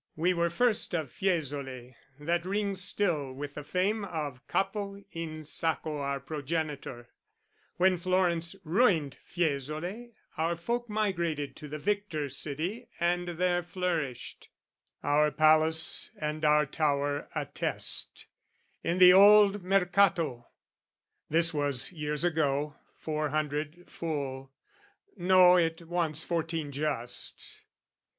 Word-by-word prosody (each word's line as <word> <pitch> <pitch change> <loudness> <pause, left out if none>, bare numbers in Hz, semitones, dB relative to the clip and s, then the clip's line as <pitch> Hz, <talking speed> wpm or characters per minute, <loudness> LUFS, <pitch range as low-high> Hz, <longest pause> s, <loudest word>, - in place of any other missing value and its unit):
We 175 +4 +2
were 170 -1 +1
first 215 +1 +1
Of 155 -7 -3
Fiesole, 140 -8 -3 0.3
that 170 +3 0
rings 195 0 0
still 170 -9 0
with 145 +2 -6
the 150 - -7
fame 200 +7 0
Of 150 -9 -5
Capo 200 0 -2
in 155 -2 -6
Sacco 155 0 0
our 140 0 -2
progenitor: 145 -4 -4 0.7
When 185 0 +3
Florence 175 -2 0
ruined 165 - +2
Fiesole, 170 - -3 0.3
our 165 +2 0
folk 235 +7 -3
Migrated 170 -9 -1
to 150 - -8
the 150 +1 -5
victor 185 -5 -2
city, 160 - -4
and 175 +1 0
there 175 +1 0
Flourished, 170 -8 -4 0.5
our 150 +1 +3
palace 155 +4 +3
and 155 0 -4
our 150 0 +4
tower 145 -1 -1
attest, - - -2 0.6
In 170 +2 0
the 180 -1 +9
Old 205 0 +7
Mercato, 180 -8 +2 0.8
this 165 +2 +3
was 140 -2 +1
years 150 -2 -2
ago, 150 -3 0 0.2
Four 155 -1 -2
hundred, 155 +3 -3
full, 135 -5 -5 0.6
no, 180 -1 +6
it 165 0 -1
wants 165 -2 -1
fourteen 165 -3 -2
just. 135 -4 -4
160 Hz, 115 wpm, -29 LUFS, 150-180 Hz, 0.8 s, the